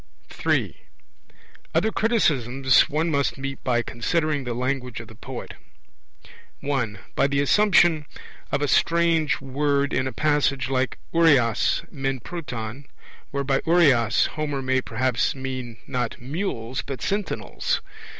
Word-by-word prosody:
III. - - +2 1.0
Other 220 - +2
criticisms 135 - +3
one 160 +3 0
must 140 -2 0
meet 135 0 -5
by 120 -2 +1
considering 150 +3 -1
the 120 -1 -3
language 125 -1 -2
of 115 - -9
the 110 - -13
poet: 120 +3 -8 1.1
(1) 125 -7 -1 0.2
by - - +2
the 140 0 0
assumption 170 -1 +4 0.4
of 145 - 0
a - - +1
strange 165 0 +2
word 140 +1 0
in 130 0 +1
a - - -3
passage 140 -1 +1
like 130 -1 0 0.2
oureas 140 -9 +3
men 135 -2 -2
proton, 125 -4 -6 0.4
where 140 0 -2
by 135 0 +1
oureas 140 -10 +4
Homer 145 -3 -3
may 130 0 +1
perhaps 125 +2 0
mean 130 -3 -5
not 125 -4 -3
mules 130 - -3
but 130 -3 -6
sentinels. 200 0 -1
135 Hz, 130 wpm, -24 LUFS, 125-150 Hz, 1.1 s, assumption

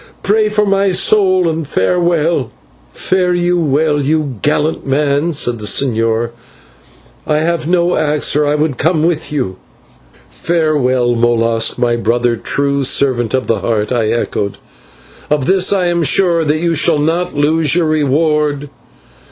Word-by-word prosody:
Pray 215 +2 +2
for 210 0 +1
my 195 -1 +1
soul, 185 -1 +2
and 160 -2 -3
farewell." 165 - 0 0.4
"Fare 180 -1 0
you 175 0 0
well, 150 -1 +1
you 145 -4 -1
gallant 150 +1 0
man," 145 +3 0
said 120 -6 -1
the 105 - -4
señor. 115 -1 0 1.0
"I 150 - +1
have 165 -1 -1
no 175 0 +1
axe 150 -1 0
or 150 0 +2
I 145 - +1
would 150 -3 -1
come 160 0 +1
with 165 -2 -1
you." 125 -11 -3 0.7
"Farewell, 140 -7 0
Molas, 115 -1 0
my 120 -1 0
brother, 120 +1 0
true 140 +4 -1
servant 130 -3 0
of 130 - -2
the 115 -3 -1
Heart," 105 -1 -2
I 115 -3 0
echoed; 110 -3 -2 0.7
"of 150 -3 0
this 190 +2 +2
I 190 -3 +1
am 175 -1 0
sure, 170 +1 +2
that 150 +1 +1
you 170 0 0
shall 165 0 +2
not 165 +3 -1
lose 150 +1 +1
your 175 -2 +1
reward." 150 -1 0
150 Hz, 150 wpm, -14 LUFS, 125-170 Hz, 1.0 s, Pray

